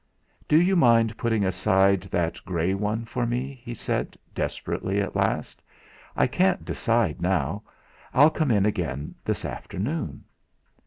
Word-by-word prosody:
"Do 155 - +5
you 185 +3 +3
mind 115 -7 +4
putting 115 -4 0
aside 95 +1 +3
that 85 -2 -1
grey 90 0 0
one 105 +3 -2
for 120 +1 -2
me?" 125 +2 -3
he 120 -1 -6
said - - -3 0.2
desperately 100 +2 -2
at 100 - -2
last. - - -1 0.5
"I - - +3
can't 185 +1 +1
decide 115 - 0
now; 90 +1 0 0.5
I'll 145 +4 +6
come 155 -3 0
in 100 -4 +3
again 80 -9 -2
this - - -2
afternoon." 105 - -4
105 Hz, 140 wpm, -25 LUFS, 95-125 Hz, 0.5 s, I'll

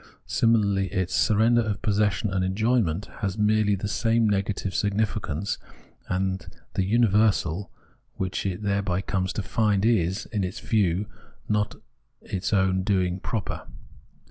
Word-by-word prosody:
Similarly 100 -4 +2
its 95 0 -2
surrender 110 +6 +4
of 110 -1 -3
possession 105 -2 +1
and 95 -1 +1
en 95 +1 -1
joyment 110 -5 0
has 95 -1 -2
merely 105 -1 +3
the 100 +2 -4
same 115 +2 +2
negative 100 -1 -1
significance, 100 -4 -1 0.5
and 95 -1 -1 0.3
the 95 - +1
universal 105 -3 +2 0.5
which 95 -1 -2
it 95 +2 -4
thereby 100 -2 0
comes 95 -1 -1
to 105 - -3
find 105 -1 +1
is, 100 -3 +1
in 105 -3 0
its 90 - -4
view, 100 -3 +1 0.4
not 105 -1 0 0.4
its 95 -1 -4
own 95 -2 +2
doing 95 -2 0
proper. 105 0 -4
100 Hz, 135 wpm, -26 LUFS, 95-110 Hz, 0.5 s, surrender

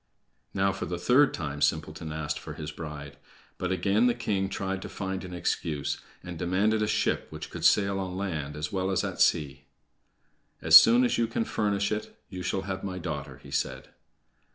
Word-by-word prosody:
Now, 100 0 +2
for 95 - -5
the 90 +1 -3
third 135 +8 +4
time, 75 -3 -5
Simpleton 80 0 -1
asked 80 -1 -3
for - - -8
his 75 0 -6
bride. 75 -3 -8 0.4
But 90 0 -2
again 100 +6 +2
the 120 - +2
king 95 -2 -1
tried 95 -1 -3
to - - -7
find 95 -1 -4
an 90 - -8
excuse, 75 -4 -2 0.2
and 90 -2 -7
demanded 100 +5 +1
a 105 - +1
ship - - 0
which - - -8
could - - -7
sail 100 -1 +4
on 95 -1 -4
land 80 -7 -3
as 75 0 -4
well 95 -1 -1
as 95 - +1
at - - -3
sea. 70 -1 +2 0.9
"As 80 0 +5
soon 115 +10 +9
as 120 - +1
you 115 - +2
can 115 0 -1
furnish 100 -1 0
it, 105 0 -4
you 90 -1 -6
shall 95 +1 -2
have 95 0 -4
my 95 -2 -4
daughter," 75 -6 -5
he - - -12
said. - - -2
95 Hz, 195 wpm, -28 LUFS, 80-100 Hz, 0.9 s, soon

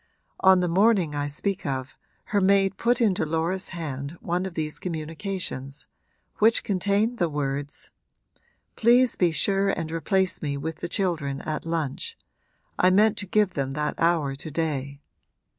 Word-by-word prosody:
On 190 -1 +6
the 180 - +1
morning 190 -2 +3
I 145 0 -1
speak 190 +7 -2
of 130 -1 -3 0.4
her 205 - +4
maid 195 0 +3
put 240 +1 +2
into 205 -5 +2
Laura's 165 +4 -1
hand 150 -2 -5
one 180 +2 -1
of 180 - -9
these 155 -1 -2
communications, 160 -4 -4 0.5
which 220 +2 +4
contained 205 +4 +1
the 175 -2 +2
words: 145 -1 -3 0.8
'Please 240 +2 +4
be 175 -2 +2
sure 195 +6 +1
and 165 -4 -2
replace 190 +3 0
me 140 -2 -2
with 160 +3 -4
the 175 - -5
children 160 -8 -1
at 155 +1 -4
lunch 165 - -3 0.6
I 185 - +5
meant 210 +3 +4
to 205 - -4
give 210 0 +2
them 135 -4 -2
that 150 +1 -1
hour 165 -5 +2
to 140 +3 -7
day. 140 -3 -3
170 Hz, 155 wpm, -25 LUFS, 150-195 Hz, 0.8 s, On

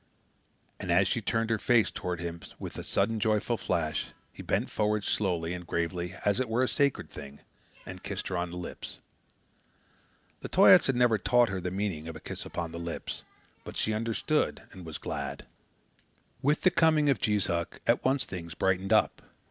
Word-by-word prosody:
And 90 - -3
as 95 +2 +4
she 115 - 0
turned 115 +2 0
her 110 - +1
face 120 -4 +3
toward 90 -2 -3
his 85 -1 -7
with - - -6
a - - -5
sudden 110 +3 0
joyful 110 +2 +1
flash, 80 -7 -1 0.3
he - - -9
bent - - -1
forward, 105 -1 +1
slowly 90 -5 0
and 90 -1 -7
gravely, 85 +2 -2
as 100 +2 +3
it 130 -3 -1
were 120 +3 +2
a - - +2
sacred 140 0 +1
thing, 70 -1 -10 0.4
and - - -8
kissed - - -4
her 95 - -2
on 90 0 -1
the 90 - -7
lips. 90 - -7 1.4
The - - -7
Toyaats - - +7
had 135 - +2
never 120 -3 +4
taught 120 +5 +4
her 95 -1 -3
the 90 - -2
meaning 95 -5 -3
of 80 - -6
a - - -7
kiss - - -7
upon 85 -1 -4
the 85 - -6
lips, 85 -1 -5 0.4
but - - -8
she 110 - +1
understood 110 -4 0
and 90 -3 -10
was 80 - -5
glad. - - -5 1.0
With 145 +3 +2
the 185 - +5
coming 155 -3 +4
of 140 -4 +2
Jees 105 -2 +2
Uck, 85 +2 -2
at 115 - +3
once 135 +1 +2
things 85 -4 -7
brightened 95 +1 0
up. 110 - +3
100 Hz, 190 wpm, -29 LUFS, 85-115 Hz, 1.4 s, Toyaats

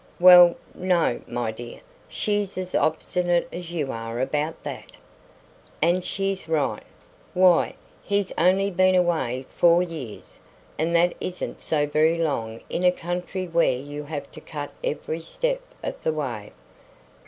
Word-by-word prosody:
"Well, 180 -1 +9 0.2
no, 180 -8 +1
my 120 -2 -2
dear; 120 +2 -9 0.3
she's 205 -2 -1
as 185 0 -4
obstinate 175 +2 +1
as 175 -1 -6
you 150 -6 -2
are 115 +1 -5
about 150 +4 -2
that." - - -7 0.9
"And 175 +3 +2
she's 195 -3 -2
right. 155 -3 0 0.5
Why, 180 -2 +4 0.3
he's 200 -1 0
only 190 +3 +3
been 185 +1 +4
away 160 -8 +1
four 175 +1 +5
years, 155 -11 -8 0.4
and 165 +2 +1
that 175 +1 +4
isn't 185 - -5
so 150 -2 +1
very 155 +3 +2
long 115 -9 -2
in 180 - -3
a 180 - +6
country 180 +1 -4
where 165 -6 +2
you 145 +3 -7
have 145 -1 -6
to - - -11
cut 145 -2 -6
every 160 +2 -3
step - - -2 0.2
of - - -5
the 160 - 0
way." 120 -9 -4
170 Hz, 140 wpm, -24 LUFS, 145-180 Hz, 0.9 s, Well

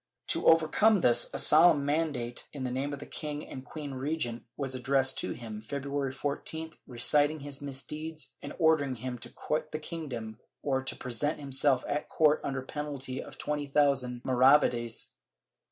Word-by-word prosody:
To - - +1
overcome 165 +6 +5
this, 120 -3 +4
a - - -4
solemn 155 -2 +6
mandate 145 -6 -1
in 140 -3 -5
the 125 - -2
name 135 +3 -2
of 145 - -4
the 140 - -9
king 150 -1 -5
and 130 - -8
queen 145 -1 -7
regent 130 -3 -2 0.2
was 135 -2 -3
addressed 130 +1 +2
to - - -2
him, 110 -3 -7
February 140 +3 -3
14th, 150 +4 -3
reciting 145 +5 +3
his 140 -1 -6
misdeeds 150 +3 -5
and - - -7
ordering 155 -6 +3
him 125 +1 -5
to - - -5
quit 155 0 -3
the 155 - -2
kingdom 130 -9 -6 0.2
or 135 -2 0
to - - -3
present 135 +5 -2
himself 135 -1 +2
at 145 +1 -2
court 155 -1 +3
under 135 -2 -3
penalty 140 -2 -5
of - - -11
twenty 150 -1 -2
thousand 135 -4 +1
maravedis. 125 -3 +3
140 Hz, 165 wpm, -30 LUFS, 130-150 Hz, 0.2 s, solemn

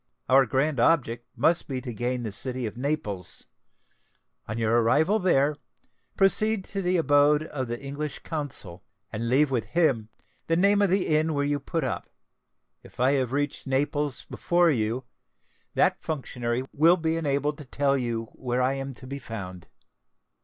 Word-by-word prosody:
Our 135 +1 +5
grand 135 +3 0
object 120 -4 +2
must 170 +1 +2
be 130 -2 -3
to 125 -2 -6
gain 120 +2 -2
the 110 - -4
city 125 +4 -1
of 110 - -5
Naples. 120 - -2 1.0
On 110 - -4
your 115 +1 +2
arrival 160 - +3
there, 150 -6 +2 0.6
proceed 210 +1 +3
to 200 - -1
the 180 0 +1
abode 150 -1 +4
of 135 -5 -4
the 120 +1 -4
English 145 +1 -5
Consul, 140 - -5 0.3
and 115 +2 -2
leave 135 +3 +3
with 120 -4 0
him 135 -11 +1 0.4
the 165 - +2
name 200 +3 +4
of 200 - +3
the 190 +1 +2
inn 155 0 +1
where 145 0 +1
you 145 0 0
put 165 +4 -3
up: - - -3 0.7
if - - -17
I 130 +2 +4
have 130 -3 0
reached 145 0 -2
Naples 145 +1 0
before 175 -1 +2
you, 115 0 -1 0.7
that - - +2
functionary 125 -5 -3
will 165 +5 +5
be 160 -1 0
enabled 145 -1 -1
to 150 - -9
tell 140 +2 +1
you 120 -3 -2
where 125 -1 -2
I 130 +1 +2
am 135 -1 -5
to 130 - -10
be 140 +2 -6
found." 95 -8 -7
140 Hz, 165 wpm, -26 LUFS, 120-155 Hz, 1.0 s, Our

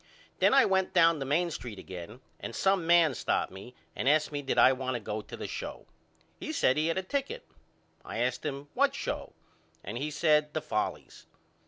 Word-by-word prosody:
Then - - +5
I 275 -1 +6
went 190 -1 +1
down 165 -2 +5
the 135 - -3
Main 170 +5 +1
Street 120 -8 -6
again 95 +7 -9 0.2
and 115 - -6
some 190 -3 +2
man 170 -4 +5
stopped - - -1
me 100 +6 -11 0.2
and 135 - +1
asked 155 +1 +3
me 145 -1 -3
did 135 - -2
I 130 - +7
want 130 -1 -3
to - - -2
go 110 0 -4
to 105 - -10
the - - -5
show. - - -6 0.5
He - - -4
said 130 - +3
he 155 +1 +1
had 165 - 0
a 190 - -1
ticket. 280 - -3 0.6
I - - -6
asked 125 +2 -1
him 145 -1 -4
what - - +2
show - - -4 0.5
and 110 +5 -5
he 150 +3 -2
said 150 0 +2
the 155 - 0
Follies. 105 -8 -4
150 Hz, 205 wpm, -29 LUFS, 125-170 Hz, 0.6 s, I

